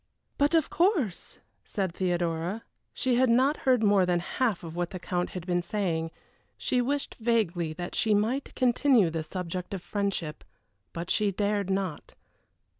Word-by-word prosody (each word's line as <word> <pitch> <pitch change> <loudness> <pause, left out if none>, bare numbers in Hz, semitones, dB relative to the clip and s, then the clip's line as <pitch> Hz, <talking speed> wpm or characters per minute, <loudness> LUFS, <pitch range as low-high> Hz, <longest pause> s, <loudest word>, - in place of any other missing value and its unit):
"But 290 +3 +3
of 320 -3 +2
course," 335 - +1 0.3
said 190 -5 -2
Theodora. 175 +2 -1 0.3
She 255 -2 0
had 260 0 +4
not 260 +6 +4
heard 250 -3 +4
more 200 -2 +5
than 180 -1 +2
half 215 +3 -1
what 170 +1 -3
the 185 - -6
Count 180 0 -2
had 175 - -6
been 175 -1 +1
saying; 170 -4 -1 0.5
she 250 - +1
wished 280 +3 -2
vaguely 200 -8 +1
that 175 +2 -6
she 215 -2 +2
might 235 +7 -1
continue 245 - +4
the 160 0 -2
subject 180 +3 -4
of 180 - -7
friendship, 200 -7 -2 0.5
but 170 +1 -5
she 210 -1 +2
dared 205 0 0
not. 190 -5 -3
195 Hz, 155 wpm, -28 LUFS, 175-240 Hz, 0.5 s, more